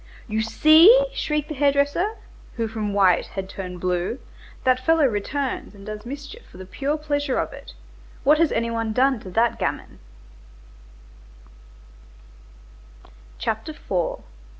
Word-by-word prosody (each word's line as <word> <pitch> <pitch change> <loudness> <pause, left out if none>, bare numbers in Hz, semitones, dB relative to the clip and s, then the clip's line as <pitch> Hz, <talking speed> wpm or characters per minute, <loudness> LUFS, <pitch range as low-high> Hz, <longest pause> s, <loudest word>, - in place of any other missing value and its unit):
"You 220 -1 -1
see!" 320 - +6
shrieked 300 - -2
the - - -3
hair 285 0 +3
dresser, 285 +10 0 0.4
who 230 -2 -1
from 215 -2 -3
white 195 -3 +3
had 190 -1 -6
turned 185 -2 -7
blue, 180 +5 -1 0.5
"that 255 0 +3
fellow 325 0 +4
returns 255 +2 -2
and 195 0 -13
does 215 +1 -7
mischief 290 - -8
for - - -16
the 185 - -9
pure 280 +10 -2
pleasure 290 -3 -1
of - - -2
it. - - -11 0.5
What 300 +2 +4
has 330 -2 +3
any 230 0 -1
one 225 -1 -2
done 260 +1 +2
to 190 - -10
that 230 +5 +1
gamin?" - - -4
255 Hz, 130 wpm, -23 LUFS, 210-295 Hz, 0.5 s, see